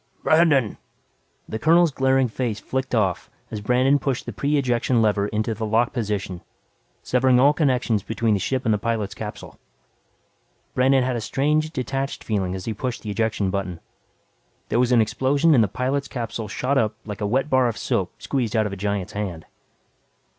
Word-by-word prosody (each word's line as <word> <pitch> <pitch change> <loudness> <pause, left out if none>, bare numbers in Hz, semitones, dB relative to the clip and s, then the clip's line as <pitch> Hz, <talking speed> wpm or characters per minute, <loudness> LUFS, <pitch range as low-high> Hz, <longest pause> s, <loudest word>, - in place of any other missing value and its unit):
"Brandon 155 -8 +3 0.3
!" - - -43
The 110 - -4
colonel's 165 +2 +4
glaring 135 -1 +2
face 115 -2 -3
flicked 130 -1 -3
off 95 -5 0 0.2
as 105 - -4
Brandon 130 +6 +3
pushed 135 -3 -2
the - - -6
pre 145 +1 0
ejection 125 -2 +1
lever 105 -2 +2
into 110 +2 -1
the 110 +1 -6
lock 110 +2 +1
position 100 -6 -3 0.6
severing 125 0 +3
all 140 +3 +5
connections 125 -8 +1
between 115 +1 0
the 100 - +1
ship 130 +7 -2
and 110 - +3
the 105 - 0
pilot's 110 -2 -2
capsule. 105 0 -8 1.1
Brandon 130 +1 +3
had 130 0 -1
a 115 - -2
strange, 150 +6 0
detached 135 -1 -3
feeling 95 -4 -1
as 95 - -6
he 115 - -2
pushed 125 +3 -4
the 105 - -4
ejection 105 -3 0
button. 95 -4 -3 0.9
There 120 - +1
was 125 0 +2
an 120 -2 +5
explosion 140 +8 +2
and 120 -5 +5
the - - +1
pilot's 130 +6 -2
capsule 115 -3 -5
shot 135 +6 0
up 110 -1 0
like 105 0 -7
a 105 - 0
wet 130 +6 +1
bar 130 -3 +3
of 115 -3 -3
soap - - -1
squeezed 125 -6 -2
out 110 -1 +3
of 105 - -3
a - - -6
giant's 100 0 -2
hand. 90 -6 -4
115 Hz, 185 wpm, -23 LUFS, 105-130 Hz, 1.1 s, all